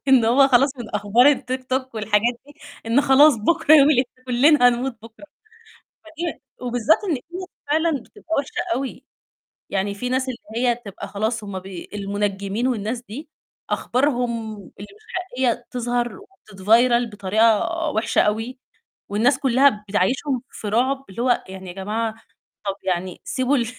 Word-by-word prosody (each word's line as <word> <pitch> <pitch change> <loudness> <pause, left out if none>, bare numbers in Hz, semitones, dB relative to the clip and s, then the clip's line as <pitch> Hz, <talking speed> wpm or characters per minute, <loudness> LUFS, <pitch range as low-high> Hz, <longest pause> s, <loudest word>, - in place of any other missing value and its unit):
إن 260 -3 +6
هو 265 +4 +5
خلاص 270 +2 +3
من 235 - -7
أخبار 220 +7 +4
الTikTok 260 0 -3
والحاجات 215 +2 +1
دي، 290 - -16 0.3
إن 230 +5 +3
خلاص 285 0 +6
بُكرة 310 +7 +3
يوم 285 -2 +7
القيامة، 255 -3 +2 0.2
كلّنا 255 +1 +5
هنموت 245 0 -1
بُكرة. 230 +5 -13 0.8
فدي 325 -2 -6 0.2
وبالذات 245 +4 +2
إن 390 - -1
هي 345 +8 -7 0.2
فعلًا 320 +3 +2
بتبقى 335 -6 -6
وِحشة 285 +5 -3
أوي، 265 0 -5 0.6
يعني 200 +1 -1
في 250 +5 -4
ناس 260 +1 0
اللي 250 - -6 0.3
هي 240 - +3
تبقى 200 -4 -9
خلاص 220 +3 -2
هُم 200 -2 -5
بي 185 -2 -9
المُنجّمين 200 +2 -2
والناس 230 -1 -2
دي، 260 +6 -9 0.4
أخبارهم 240 -4 -1
اللي 200 0 -12
مش 430 - -22
حقيقية 255 -10 -2
تظهر 245 - -2 0.3
وتتفيرل 230 +5 +3
بطريقة 210 +2 +2 0.2
وِحشة 225 -5 +1
أوي، 225 +5 -1 0.5
والناس 240 +6 +2
كلّها 260 -5 +3
بتعيِّشهُم 250 +7 0
في 215 - -7
رعب، 265 +5 0
اللي 195 +5 -5
هو 245 0 +2
يعني 190 0 -9
يا - - -7
جماعة 215 +4 -3 0.5
طب 195 -1 -1
يعني 180 0 -3
سيبوا 260 +2 0
ال 240 - 0
240 Hz, 150 wpm, -22 LUFS, 210-270 Hz, 0.8 s, يوم